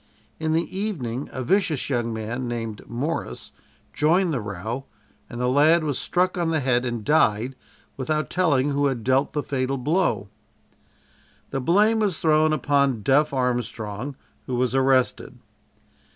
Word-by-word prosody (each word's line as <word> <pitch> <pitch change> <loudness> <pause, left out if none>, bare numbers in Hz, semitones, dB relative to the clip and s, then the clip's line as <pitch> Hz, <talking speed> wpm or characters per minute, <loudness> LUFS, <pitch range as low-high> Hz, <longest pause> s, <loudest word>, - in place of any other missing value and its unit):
In 160 0 0
the 165 +1 +1
evening 145 - -3
a 130 - -4
vicious 160 -1 +1
young 120 -4 -1
man, 115 +3 -4
named 115 -3 -4
Morris, 140 +8 -4 0.4
joined 170 +3 +2
the 130 - -1
row 105 +6 -5 0.4
and 120 - -7
the 125 - +1
lad 155 +6 +4
was 145 -4 -1
struck 180 +1 0
on 170 -1 +1
the 160 -1 +1
head 125 -2 +1
and 120 -3 -3
died 130 -4 +2 0.4
without 155 +3 -1
telling 145 -6 +2
who 140 0 +2
had 125 -5 -2
dealt 130 +3 +2
the 150 - -1
fatal 135 0 -1
blow. 150 - 0 1.2
The 135 - -2
blame 210 - +3
was 200 -6 0
thrown 155 -1 +3
upon 140 -5 +1
"Duff" 145 +5 +3
Armstrong, 125 -1 -2 0.3
who 125 - -2
was 125 0 0
arrested. 130 -1 +1
135 Hz, 150 wpm, -24 LUFS, 120-155 Hz, 1.2 s, lad